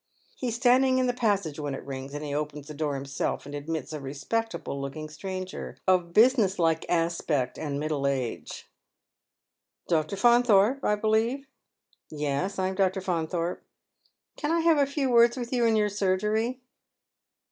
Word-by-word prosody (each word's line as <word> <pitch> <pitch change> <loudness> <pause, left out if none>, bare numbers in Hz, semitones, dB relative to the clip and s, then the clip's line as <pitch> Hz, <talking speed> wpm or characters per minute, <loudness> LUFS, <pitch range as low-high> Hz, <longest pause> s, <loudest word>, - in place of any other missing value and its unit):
He 255 - -4
is 230 - -1
standing 255 +1 +4
in 255 - +2
the 245 - +1
passage 200 - 0
when 145 -2 -3
it - - -9
lings, 135 +1 -6
and 150 +1 -5
he 145 - -4
open 150 0 -3
the 150 +2 -9
door 145 -1 -2
himself, 135 +1 -3
and 145 - -9
admits 150 0 -4
a 155 - -4
rc^peo 145 +12 -2
table 140 -10 -5
looking 155 +3 -5
stranger, 185 +4 -6
of 180 -2 +3
business 220 -2 +4
like 165 -2 +1
aspect 165 -6 0
aj>4 145 -3 -3
middle 145 -2 -1
age. 130 -4 -3 0.6
" - - -52
Dr. 160 +2 0
Faunthorpe, 240 +2 +4
I 210 - +2
believe 220 +6 0 0.2
?" - - -60
" - - -56
Yes, 150 +5 -2
I 185 0 0
am - - -3
Dr. 190 0 +1
Faunthorj^e." 175 -1 -2 0.4
" - - -43
Can 300 +1 -2
I 335 0 +2
have 325 -2 +4
a 280 - +3
few 275 -2 -1
words 235 +1 +5
with 245 0 -4
you 240 -2 +2
in 225 - +3
your 210 -1 +2
surgery 210 +5 0
185 Hz, 180 wpm, -27 LUFS, 150-235 Hz, 0.6 s, words